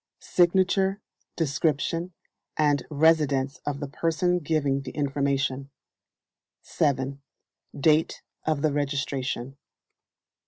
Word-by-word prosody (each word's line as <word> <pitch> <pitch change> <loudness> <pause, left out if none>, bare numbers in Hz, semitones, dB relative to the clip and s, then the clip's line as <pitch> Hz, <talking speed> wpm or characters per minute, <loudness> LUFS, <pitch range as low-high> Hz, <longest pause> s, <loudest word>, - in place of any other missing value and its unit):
Signature, 190 +2 +2 0.4
description, 165 +3 0 0.5
and 145 -3 +2
residence 145 -3 +2
of 145 -1 -2
the 145 - -4
person 165 +4 0
giving 145 -4 0
the 135 - -7
information. 140 -1 -1 0.9
7. 135 -1 -1 0.6
Date 155 +2 +2 0.2
of 155 -2 -1
the 155 -2 +2
registration. 140 -2 -2
145 Hz, 85 wpm, -26 LUFS, 135-160 Hz, 0.9 s, Signature